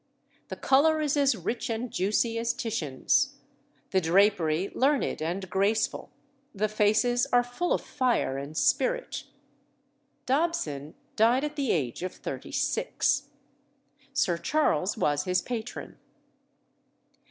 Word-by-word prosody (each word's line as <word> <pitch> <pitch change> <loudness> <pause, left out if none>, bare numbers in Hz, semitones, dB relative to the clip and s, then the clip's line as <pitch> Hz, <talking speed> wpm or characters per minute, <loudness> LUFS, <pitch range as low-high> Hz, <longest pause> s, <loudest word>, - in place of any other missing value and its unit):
The - - -5
colour 310 +4 +3
is 300 -2 0
as 280 -4 +3
rich 240 +3 -3
and 230 +1 -3
juicy 225 +3 0
as 235 +1 0
Titian's, 160 - 0 0.6
the 190 - +3
drapery 180 -1 +2
learned 275 - +1
and 180 +4 -3
graceful, 200 +4 0 0.5
the 210 +2 +1
faces 215 +4 +2
are 245 0 +5
full 245 +9 -3
of - - +2
fire 250 - 0
and 140 +3 -6
spirit. - - 0 1.0
Dobson 255 - -1 0.2
died 235 +5 +3
at 300 0 -3
the 280 -4 -1
age 130 -6 -1
of 185 0 -4
thirty - - -7
six. - - 0 0.8
Sir 180 -11 +1
Charles 195 - +1
was 145 -7 +1
his 180 0 +2
patron. 240 -1 -6
220 Hz, 120 wpm, -28 LUFS, 180-260 Hz, 1.0 s, are